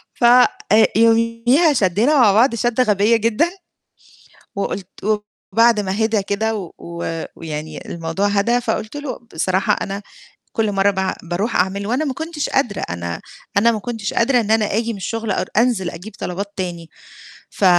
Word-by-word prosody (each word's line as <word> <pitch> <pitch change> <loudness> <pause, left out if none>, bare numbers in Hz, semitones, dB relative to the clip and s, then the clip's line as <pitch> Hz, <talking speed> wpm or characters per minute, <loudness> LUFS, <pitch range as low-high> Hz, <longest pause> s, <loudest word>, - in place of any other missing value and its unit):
ف - - -6
آآ 235 -2 +5
يوميها 230 +7 +3
شدّينا 215 - +2
مع 215 -5 +6
بعض 235 +4 +4
شدة 240 +2 +1
غبية 210 0 +3
جدًا، 230 +10 +1 1.1
وقُلت 200 -1 -3 0.7
وبعد 230 -1 +4
ما 200 +3 -1
هدا 220 -1 +1
كده 205 +3 -1
و 195 -6 -6
و 170 -1 -5
ويعني 155 -1 -6
الموضوع 165 +4 -2
هدا 205 +4 +2
فقُلت 225 +2 -3
له: 290 -2 -5
"بصراحة 185 +5 +1
أنا 200 +1 -4 0.5
كل 220 -3 0
مَرّة 195 +1 +3
باع 190 -1 -2
باروح 180 +7 -2
أعمل 195 +2 0
وأنا 255 +7 0
ما 275 -3 -2
كنتش 320 0 -4
قادرة، 240 -8 0
أنا 85 -1 -4 0.4
أنا 230 +3 +5
ما 220 - -2
كنتش 225 -1 -4
قادرة 245 +1 +3
إن 215 -1 -3
أنا 220 -1 +4
آجي 230 +1 0
من - - -7
الشغل 225 +3 -4
أر 185 - -1
أنزل 220 -6 +2
أجيب 180 +6 -10
طلبات 200 +3 -4
تاني، 175 -3 -5 0.6
ف - - -3
210 Hz, 160 wpm, -19 LUFS, 190-235 Hz, 1.1 s, مع